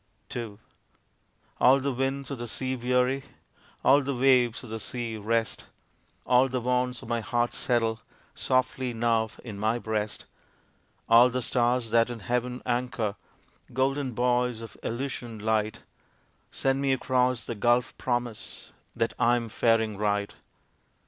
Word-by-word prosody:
II 115 -4 -5 1.0
All 130 +2 +6
the 140 0 -1
winds 135 +2 -2
of 135 - -4
the 120 - -4
sea 130 +3 -1
weary, 125 +2 +1 0.6
All 145 - +6
the 140 0 -2
waves 125 -2 +3
of 120 - -10
the 110 - -3
sea 120 -1 -3
rest, 110 +1 -1 0.6
All 125 +2 +4
the 130 0 -1
wants 125 0 0
of - - -10
my 115 0 -1
heart 120 +1 0
settle 115 -2 0 0.3
Softly 130 -1 0
now 115 -1 +1
in 105 -4 -7
my 110 +3 +1
breast. 110 -2 -3 0.8
All 120 +2 +7
the 125 0 -2
stars 120 -1 +1
that 115 0 +4
in 120 -2 -6
heaven 125 +3 -2
anchor, 120 -4 -1 0.6
Golden 135 0 0
buoys 125 0 +1
of 115 - -9
Elysian 120 -2 -4
light, 110 0 -1 0.7
Send 135 0 0
me 135 -1 +2
across 125 -2 +1
the - - -3
gulf 120 +3 +1
promise 120 -3 -3 0.2
That 115 0 0
I 120 +1 +4
am 115 -2 -3
faring 110 -2 +2
right. 105 -1 0
120 Hz, 140 wpm, -27 LUFS, 115-125 Hz, 1.0 s, All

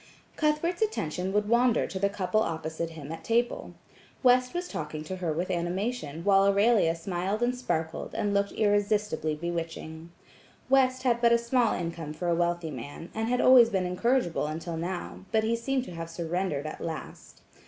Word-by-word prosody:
Cuthbert's 310 +4 0
attention 185 - -1
would 210 +1 +1
wander 240 +1 +3
to 190 - -5
the 200 +1 +2
couple 205 +2 0
opposite 160 -3 -3
him 155 -2 -9
at 165 - -7
table. 235 +1 0 0.5
West 250 0 +5
was 355 +1 -3
talking 155 - -5
to 185 +4 -5
her 175 -3 -2
with 170 +4 -2
animation, 175 - -2
while 195 0 +5
Aurelia 200 -4 +4
smiled 185 +5 -2
and 245 +1 +1
sparkled, 165 -10 -3
and 205 -1 0
looked 200 0 +1
irresistibly 205 -6 +1
bewitching. 165 0 -5 0.6
West 260 -1 +3
had 240 -2 +2
but 235 -1 +5
a 235 - +6
small 235 0 +1
income 165 -3 -4
for 175 +2 -3
a - - +3
wealthy 170 -1 0
man, 145 +6 -8
and 220 0 -2
had 250 0 +2
always 250 -3 +8
been 190 -4 0
incorrigible 180 - +1
until 165 +2 -4
now, 175 +2 -5
but 220 -1 +2
he 225 +1 +1
seemed 260 +2 -1
to 250 - -9
have 165 0 -6
surrendered 165 -2 -2
at 155 - -6
last. 160 -2 -7
190 Hz, 175 wpm, -28 LUFS, 165-235 Hz, 0.6 s, always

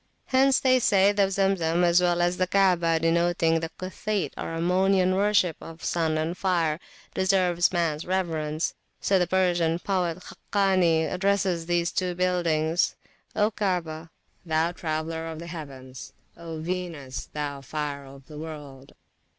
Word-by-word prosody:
Hence 265 0 +3
they 255 -1 +4
say 200 -3 +4
the 200 -1 +2
Zemzem, 185 -3 +1
as 175 +1 +4
well 175 -1 +2
as 175 +1 +1
the 185 - +1
Kaabah, 175 -4 +3
denoting 165 0 +2
the 165 0 -4
Cuthite 195 +1 -3
or - - -5
Ammonian 185 +2 +2
worship 200 -4 +2
of 165 0 -11
sun 160 -2 0
and 160 +3 -2
fire, 170 -4 0 0.3
deserves 185 -2 +2
mans 165 -3 0
reverence. 165 -4 -1 0.3
So 195 -1 +2
the 180 - +1
Persian 175 -3 +2
poet 180 -2 -1
Khakani 185 -5 +1
addresses 185 -3 0
these 175 0 +1
two 180 -1 -1
buildings: 170 -2 +1 0.4
O 210 +1 +2
Kaabah, 170 -6 -2 0.3
thou 160 0 +1
traveller 160 -1 -3
of 160 -1 -6
the 170 - -8
heavens! 135 -6 -9 0.2
O 165 -1 -7
Venus, 165 -6 -5
thou 145 -2 -4
fire 145 0 -4
of 135 0 -14
the 150 0 -10
world! 145 -4 -9
170 Hz, 140 wpm, -26 LUFS, 160-185 Hz, 0.4 s, they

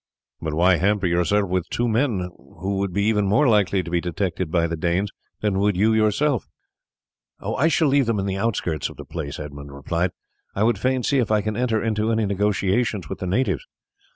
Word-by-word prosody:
"But 80 -2 -3
why 90 +2 +4
hamper 100 +1 +1
yourself 90 +4 +2
with 90 -1 -1
two 120 - 0
men, 110 -6 0 0.3
who 95 +3 -2
would 100 -1 -1
be 100 +3 0
even 105 -1 +2
more 115 +9 +4
likely 100 -4 +3
to 85 - -7
be 85 -1 +1
detected 90 0 -2
by 85 0 +2
the 85 0 -2
Danes 90 +5 0 0.3
than 100 -2 +1
would 100 -2 +2
you 110 +3 +3
yourself?" 110 +5 +1 0.9
"I 155 - 0
shall 165 -1 +3
leave 135 -2 +3
them 115 -2 +1
in 100 - -1
the 95 -1 -1
outskirts 95 -8 -1
of - - -13
the - - -9
place," 75 -4 -5
Edmund 70 -1 -8
replied. 85 +6 -1 0.5
"I 100 - +1
would 115 -3 +2
fain 130 +2 0
see 140 +2 +2
if 120 - 0
I 105 -1 +3
can 110 0 -3
enter 115 -2 0
into 110 0 0
any 110 -1 +1
negotiations 100 +1 0
with - - -5
the 95 - -3
natives. 125 - 0
100 Hz, 210 wpm, -23 LUFS, 90-110 Hz, 0.9 s, why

